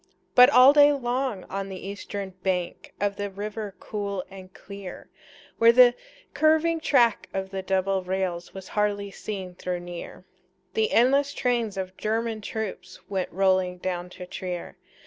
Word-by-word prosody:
But 250 +1 +9
all 260 0 +8
day 290 0 +7
long 250 -6 -2
on 195 0 -5
the 190 0 -7
eastern 200 -1 -6
bank 180 -2 -3
Of 200 0 -1
the 205 0 -3
river 205 +1 -6
cool 200 -3 -4
and 190 -1 -11
clear, 200 -1 -10 0.5
Where 230 0 +8
the 245 0 +7 0.4
curving 315 +3 +3
track 240 -8 +2
of 190 0 -3
the 195 -1 -3
double 190 0 0
rails 180 -2 -3
Was 190 -1 -10
hardly 205 -1 -1
seen 190 -3 -6
though 180 -1 -1
near, 175 -1 -9 0.5
The 445 0 +1
endless 275 +4 +3
trains 235 -5 0
of 185 0 -4
German 220 0 -2
troops 220 -1 -6
Went 190 -2 -2
rolling 185 -1 +2
down 180 -1 -4
to 180 - -7
Trier. 180 -1 -6
200 Hz, 150 wpm, -26 LUFS, 185-235 Hz, 0.5 s, But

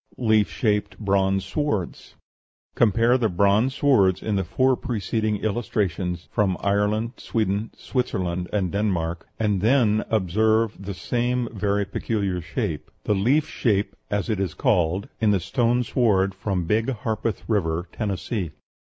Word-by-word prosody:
LEAF 110 -4 +3
SHAPED 105 -3 -1
BRONZE 95 -2 +1
SWORDS 105 - -3 0.6
Compare 115 +3 +3
the 115 -3 +2
bronze 100 +8 +2
swords 100 -11 +3
in 105 - -1
the 95 - +1
four 130 +4 +2
preceding 110 -2 -1
illustrations 95 -5 -1
from 100 -5 +1
Ireland, 105 +3 +1
Sweden, 105 -1 -1
Switzerland, 90 -8 -2
and 95 -4 0
Denmark 85 -5 -1
and 105 -4 +1
then 110 -2 +3
observe 110 +2 +2
the 100 -1 -5
same 120 +3 -1
very 100 -1 0
peculiar 100 -3 -2
shape 80 -2 -4
the - - +1
leaf 125 +10 +2
shape, 105 -4 0
as 105 -1 -1
it 110 -4 -1
is 95 -5 -2
called 95 -5 +1
in 110 - +3
the 100 -2 +3
stone 120 +7 +1
sword 100 -5 +2
from 95 -2 -2
Big 110 +7 +1
Harpeth 110 -5 -2
River, 85 -4 0
Tennessee. 100 -4 -3
105 Hz, 135 wpm, -24 LUFS, 95-115 Hz, 0.6 s, LEAF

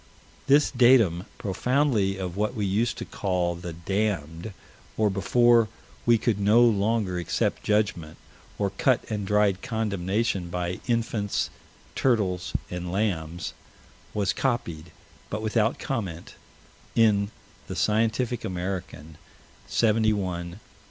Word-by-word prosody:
This 145 +2 +5
datum, 120 -9 +4
profoundly 105 -1 +1
of 90 -2 -4
what 105 +4 -1
we 105 -3 -1
used 115 +5 0
to - - -5
call 90 -3 -1
the 85 0 -7
"damned," 85 0 -2 0.5
or 110 -2 +3
before 120 +4 +4 0.4
we 120 -1 +6
could 110 -2 0
no 105 +4 +5
longer 105 -4 +2
accept 85 - -1
judgment, 105 -7 0 0.4
or 100 -2 0
cut 125 +5 +2
and 105 -2 -2
dried 105 -2 +2
condemnation 105 -4 -1
by 90 0 -3
infants, 115 -4 0 0.4
turtles, 95 -8 0 0.2
and 90 0 -4
lambs, 85 -5 -2 0.6
was 100 -2 0
copied 90 - -2 0.4
but 110 +1 -4
without 110 +1 +1
comment 100 - -4 0.6
in 105 -3 +4 0.4
the - - -5
Scientific 115 +3 +1
American, 90 -4 -5 0.5
71 110 -1 +3
371. 90 -2 -4
100 Hz, 115 wpm, -26 LUFS, 90-115 Hz, 0.6 s, we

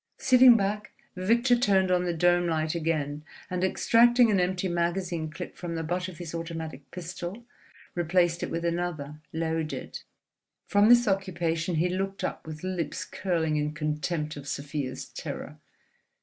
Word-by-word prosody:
Sitting 255 -2 +7
back, 210 +1 -2 0.2
Victor 235 +7 +3
turned 195 -6 +3
on 180 0 +2
the 175 - 0
dome 175 +1 +3
light 160 -1 0
again, 155 -3 -1 0.3
and 180 0 -1
extracting 235 +4 +5
an 195 - +3
empty 180 +1 0
magazine 170 -1 -1
clip 170 +3 -8
from 170 -2 -5
the 165 - -2
butt 180 +3 -2
of 180 -3 -9
his 170 -2 -7
automatic 160 -4 -6
pistol, 180 +5 -7 0.5
replaced 175 0 +1
it - - -2
with 170 +1 -3
another, 165 -4 -3
loaded. 160 -1 -3 0.7
From 205 +1 +4
this 240 -1 +6
occupation 175 -4 0
he 165 +3 +2
looked 195 +2 -3
up - - -4
with 155 0 -8
lips 180 -5 -3
curling 165 -5 -1
in 150 0 -1
contempt 150 +1 -2
of 145 -1 -9
Sofia's 140 -2 -4
terror. - - -7
175 Hz, 150 wpm, -28 LUFS, 160-190 Hz, 0.7 s, Sitting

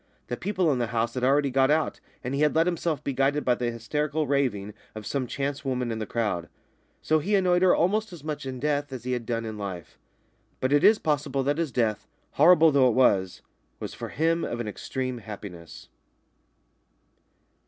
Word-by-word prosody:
The 120 - -1
people 185 0 0
in 130 - 0
the 120 - 0
house 115 0 -1
had 125 - -3
already 140 +1 +3
got 135 +1 +3
out, 155 0 +1 0.2
and 125 - -3
he 140 - 0
had 150 0 +3
let 165 +1 +4
himself 165 -4 -1
be 140 - -2
guided 140 +3 +1
by 125 - +4
the 120 0 -1
hysterical 150 +7 -2
raving 125 -8 0 0.2
of 110 -1 -7
some 135 +1 -2
chance 140 +3 -3
woman 125 -3 -1
in 110 - -3
the 110 - -4
crowd. 105 -8 -2 0.5
So 155 0 +3
he 200 +7 0
annoyed 180 -2 +3
her 185 -1 +5
almost 210 +5 +1
as 170 -5 -11
much 150 -3 -4
in 130 -1 -5
death 145 0 -1
as 130 -3 -6
he 125 - -3
had 120 -2 -3
done 115 -1 -2
in 110 -1 -6
life. 95 -5 -7 0.6
But 130 +2 0
it 145 - +4
is 215 +1 +7
possible 145 -5 -1
that 145 +3 0
his 165 -5 -1
death, 115 -4 0 0.2
horrible 165 +1 +6
though 135 -2 +5
it 115 - 0
was, 95 -8 +2 0.4
was - - -6
for - - -6
him 165 +2 +1
of 120 - -3
an 120 - -3
extreme 130 +3 -4
happiness. 100 -6 -10
135 Hz, 205 wpm, -26 LUFS, 115-150 Hz, 0.6 s, is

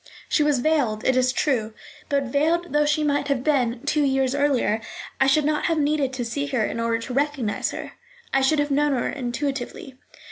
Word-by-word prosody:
She - - +1
was 295 -4 +2
veiled, 255 -8 +1
it 260 - +3
is 255 0 +3
true; 230 -6 -1 0.3
but, 280 -1 +1
veiled 315 +7 0
though 295 0 +3
she 305 +1 +1
might 285 -1 0
have 275 -3 0
been 250 -5 +1
two 300 +1 +1
years 270 -2 +1
earlier, 275 -6 +1 0.4
I 270 - +4
should 285 +2 +3
not 300 0 0
have 330 -2 +1
needed 290 -2 +1
to 250 -2 -3
see 280 +5 -3
her 255 -6 0
in - - -4
order 230 0 +1
to 230 +2 -6
recognise 275 -6 -1
her: - - -6 0.4
I 270 - +3
should 265 +4 +3
have 290 0 0
known 290 +1 +2
her 245 - -1
intuitively. 260 0 -4
275 Hz, 205 wpm, -23 LUFS, 250-295 Hz, 0.4 s, I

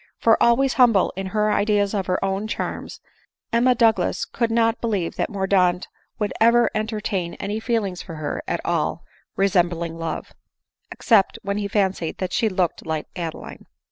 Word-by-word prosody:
For, 225 -1 +3
always 260 +3 +4
humble 230 -6 +4
in 190 0 -4
her 210 +1 +1
ideas 205 -1 +1
of 195 -3 -2
her 185 - +1
own 195 +2 -2
charms, - - -5 0.5
Emma 245 +2 +4
Douglas 225 -1 +2
could 235 -1 -1
not 230 0 +1
believe 205 -7 -1
that - - -1
Mordaunt 190 -3 +1 0.3
would 210 -1 -2
ever 235 +1 +5
en 215 0 -1
tertain 210 -5 -3
any 205 +2 -4
feeling 220 -5 -1
for 170 -1 -8
her 155 -2 -4
at - - -2
all - - -1 0.3
resembling 175 -4 0
love, 165 0 -5 0.6
except 220 -3 +2
when 200 0 -2
he 205 - -2
fancied 195 -5 -1
that 185 - -4
she 225 - +2
looked 185 -3 -1
like 160 -1 -4
Adeline. 165 -3 -7
200 Hz, 165 wpm, -22 LUFS, 180-225 Hz, 0.6 s, ever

